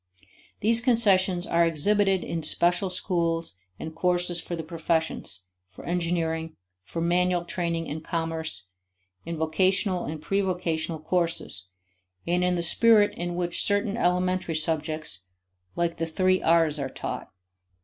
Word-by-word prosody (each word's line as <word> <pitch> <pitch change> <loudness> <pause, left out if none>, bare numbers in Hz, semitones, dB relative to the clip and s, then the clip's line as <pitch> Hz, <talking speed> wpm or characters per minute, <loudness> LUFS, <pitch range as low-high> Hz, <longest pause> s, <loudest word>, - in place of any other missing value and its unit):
These 230 +2 +4
concessions 195 -7 +3
are 170 0 +3
exhibited 190 +4 +2
in 165 - -3
special 175 +4 +2
schools 170 - -1 0.3
and 160 - -6
courses 175 0 0
for 175 - -5
the 165 - -5
professions, 160 - -1 0.3
for 95 - -13
engineering, 165 -2 -1 0.3
for 165 - -5
manual 175 +1 +1
training 170 -2 -2
and 155 +2 -5
commerce, 160 - -3 0.6
in 170 -1 -3
vocational 185 +4 +1
and 155 +2 -5
prevocational 175 -4 -1
courses; 165 - -1 0.6
and 175 +1 +1
in 180 0 +2
the 170 - -1
spirit 210 +4 +4
in 175 0 -4
which 175 -1 +1
certain 205 0 +2
elementary 180 -4 0
subjects, 155 - -2 0.5
like 170 -1 -1
the 165 0 -2
three 185 +3 +2
R's, 160 -2 +3
are 135 -1 -2
taught. - - -6
170 Hz, 130 wpm, -26 LUFS, 160-185 Hz, 0.6 s, These